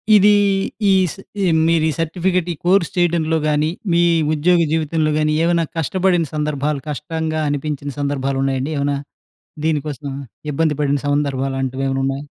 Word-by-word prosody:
ఇదీ 205 +1 +6 0.6
ఈస్ 185 -3 +2 0.3
ఈ - - +2 0.2
మీరీ 160 -1 +2
సర్టిఫికెట్ 175 +2 0
ఈ - - -9
కోర్స్ 180 -1 +3
చేయటంలో 165 -2 +2
గాని, 150 +1 +1 0.2
మీ 170 +1 +4 0.3
ఉద్యోగ 170 +4 +3
జీవితంలో 155 -1 0
గాని, 155 0 +1
ఏవేనా 170 -1 +2
కష్టపడిన 175 +2 +1
సందర్భాలు, 150 -1 -1
కష్టంగా 155 +2 -3
అనిపించిన 145 0 -3
సందర్భాలున్నాయండి 135 0 -1
ఏవేనా? 140 0 0 0.7
దీనికోసం 150 -2 -2 0.4
ఇబ్బంది 155 +1 +1
పడిన 145 0 +1
సందర్భాలాంటివేవైనా 135 -1 -1
ఉన్నాయా? 135 +1 -2
155 Hz, 120 wpm, -19 LUFS, 140-165 Hz, 0.7 s, ఇదీ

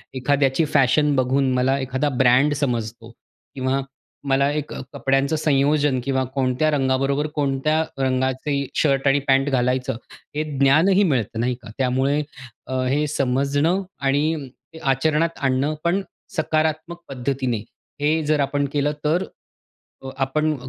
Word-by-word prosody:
एखाद्याची 140 +3 +1
फॅशन 145 +1 +3
बघून 130 +1 +1
मला 130 +2 +2
एखादा 130 +2 -1
ब्रँड 130 +3 +3
समजतो 115 -4 -3 0.5
किंवा 130 +1 0 0.5
मला 140 +1 +3
एक 150 0 -4
अ, - - -6
कपड्यांचं 135 +3 +1
संयोजन 145 -2 +2
किंवा 130 -1 0
कोणत्या 130 +3 +1
रंगाबरोबर 135 +1 +1
कोणत्या 150 +2 +1 0.2
रंगाचे 130 +2 0 0.2
शर्ट 140 -2 +2
आणि 135 +1 +4
पॅन्ट 135 +1 +3
घालायचं 125 -2 0 0.4
हे 155 - 0 0.2
ज्ञानही 165 +9 +4
मिळतं. 120 - 0
नाही 125 +2 0
का? 115 - -11
त्यामुळे 135 +3 +1 0.5
अ, 130 - -5
हे 145 +4 +1
समजणं 140 +6 +1 0.2
आणि 145 +1 0 0.3
आचरणात 155 +4 +1
आणणं 135 +2 0
पण 175 +3 +1 0.4
सकारात्मक 155 +2 -1
पद्धतीने, 130 -2 -2 0.4
हे 155 +2 +2
जर 150 0 +1
आपण 140 0 0
केलं, 145 0 +1
तर 165 +5 +2 0.8
अ, 135 - -6
आपण 150 +3 0
140 Hz, 130 wpm, -22 LUFS, 130-150 Hz, 0.8 s, आणि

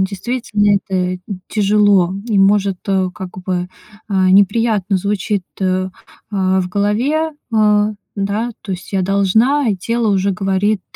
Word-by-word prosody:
действительно, 205 +1 0
это, 195 - -6 0.2
м, 180 - -5 0.3
тяжело 205 -3 +3
и, 215 -4 +1
может, 195 -1 +3
э, 190 -1 +1
как 185 -3 -8
бы, 180 -1 -3 0.4
э, 200 - -3 0.2
неприятно 200 0 +3
звучит, 200 0 -1 0.2
э, - - 0
э, 185 0 0 0.7
в 180 - -3
голове. 240 - 0 0.2
Э, 210 -1 +4 0.3
да, 205 +4 -1
то 195 - -5
есть: 180 +2 -8
"Я 190 -1 +1
должна". 220 +8 +2
И 200 - 0
тело 230 +4 -1
уже 195 0 +1
говорит: 195 +1 0
200 Hz, 140 wpm, -17 LUFS, 190-215 Hz, 0.7 s, Э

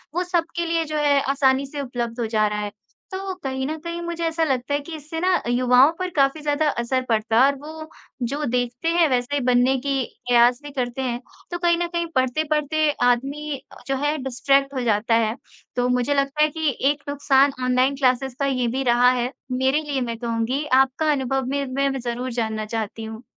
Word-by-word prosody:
वो 360 - +1
सबके 340 -1 -1
लिए 330 0 +1
जो 305 0 -3
है 290 -1 +3
आसानी 270 0 +2
से 285 +1 -6
उपलब्ध 240 -2 -4
हो 235 - 0
जा 215 -1 +2
रहा 210 0 -2
है, 205 -1 -4 0.4
तो 380 0 -4
कहीं 265 0 -2
न 315 +1 -3
कहीं 340 +1 -5
मुझे 340 0 -4
ऐसा 325 0 0
लगता 270 -1 -1
है 290 - +2
कि 315 +3 -8
इससे 310 +2 -6
ना, 365 +1 +2
युवाओं 250 +4 +5
पर 365 0 -2
काफ़ी 275 +2 +2
ज़्यादा 295 +1 +1
असर 255 +1 -1
पड़ता 225 +1 +2
है 275 +1 +6
और - - -8
वो 315 +1 -9 0.4
जो 295 +1 -2
देखते 245 +5 -2
हैं 340 -2 +4
वैसे 250 +2 0
ही 280 - 0
बनने 250 +1 +3
की 270 -1 -1 0.2
प्रयास 245 0 +5
भी 290 - -8
करते 255 -1 -3
हैं। 245 -1 -2 0.3
तो 345 - -2
कहीं 345 -1 +2
न 345 0 -1
कहीं 340 0 -2
पढ़ते-पढ़ते 300 +3 +1
आदमी 275 +5 0 0.2
अ, - - -13
जो 270 - 0
है 295 +1 +1
डिस्ट्रैक्ट 275 +2 +1
हो 260 - -2
जाता 225 0 +2
है, 220 +2 -2 0.4
तो 245 0 +1
मुझे 250 +3 +1
लगता 275 +1 0
है 305 - +3
कि 310 -4 -1 0.2
एक 290 -1 -7
नुकसान 280 -1 +3
ऑनलाइन 255 +2 +2
क्लासेज़ 260 -1 +1
का 280 - +1
ये 255 -3 0
भी 270 - 0
रहा 245 0 +5
है, 250 0 -1 0.2
मेरे 265 +4 +2
लिए 285 -3 -2
मैं 235 -2 -3
कहूँगी। 235 +5 -1 0.2
आपका 300 +4 +1
अनुभव 270 -1 0
मैं 280 +1 -1
मैं 275 0 +1
भी 270 - -3
ज़रूर 245 +1 -3
जानना 220 -1 -2
चाहती 220 0 -4
हूँ। 220 +2 -8
270 Hz, 215 wpm, -23 LUFS, 245-300 Hz, 0.4 s, है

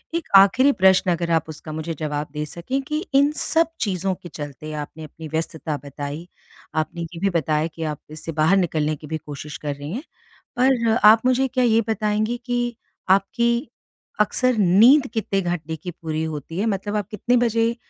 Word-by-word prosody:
एक 335 - -2
आखिरी 255 +9 +6
प्रश्न 190 -5 +4
अगर 170 0 -1
आप 160 -1 +1
उसका 155 0 -8
मुझे 160 +2 -4
जवाब 150 -1 -2
दे 150 0 -3
सकें 175 - -3
कि, 305 +3 -3
इन 280 +2 +5
सब 325 +1 +1
चीज़ों 190 -2 -1
के 175 - -12
चलते 150 0 -7
आपने 150 +1 -6
अपनी 155 +1 -9
व्यस्तता 160 0 -3
बताई, 145 +3 -6 0.5
आपने 155 +2 -2
ये 165 0 -7
भी 195 +2 +1
बताया 155 -2 0
कि 165 0 -7
आप 150 -2 -3
इससे 155 +2 -7
बाहर 160 +5 +3
निकलने 155 -4 0
की 150 +1 -12
भी 160 +1 -2
कोशिश 150 0 -8
कर 145 -1 -4
रही 145 +2 -7
हैं। 260 - -4 0.6
पर 245 -3 +3
आप 220 +2 +6
मुझे 255 +1 +3
क्या 255 0 0
ये 230 -1 +4
बताएँगी 215 +2 0
कि 240 -1 -1 0.3
आपकी 235 +7 +2 0.5
अक्सर 250 +4 +2
नींद 220 +9 +6
कितने 205 -4 0
घंटे 170 -3 -3
की 175 +3 -7
पूरी 160 -1 -4
होती 160 +2 -5
है? 210 - +1
मतलब 205 -1 -2
आप 205 -3 -1
कितने 240 +4 +1
बजे 230 0 +1
180 Hz, 185 wpm, -22 LUFS, 155-230 Hz, 0.6 s, आखिरी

